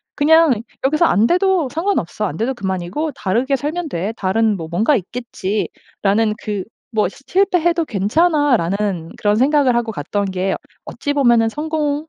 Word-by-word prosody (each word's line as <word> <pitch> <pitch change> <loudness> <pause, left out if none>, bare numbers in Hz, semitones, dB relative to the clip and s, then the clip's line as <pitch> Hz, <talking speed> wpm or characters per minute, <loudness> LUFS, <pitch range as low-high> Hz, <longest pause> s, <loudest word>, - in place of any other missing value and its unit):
'그냥 310 -5 +4 0.2
여기서 305 +5 +3
안 215 -8 +3
돼도 365 -4 +2
상관없어. 325 - -1
안 160 -6 -4
돼도 240 +4 -1
그만이고 190 - -3
다르게 240 +6 0
살면 310 +4 -3
돼. 195 0 -3
다른 210 +2 +1
뭐 165 -2 -6
뭔가 215 - +2
있겠지.'라는 215 0 -2
그 205 -3 -3 0.3
뭐 215 -4 +1
'시 195 - -12
실패해도 350 -3 +2
괜찮아.'라는 210 - +1
그런 205 0 +2
생각을 265 +1 +3
하고 235 -1 0
갔던 200 +4 -2
게 190 0 -1 0.3
어찌 285 - -3
보면은 240 -5 +4
성공 300 +3 -2
235 Hz, 320 characters per minute, -19 LUFS, 200-300 Hz, 0.3 s, 그냥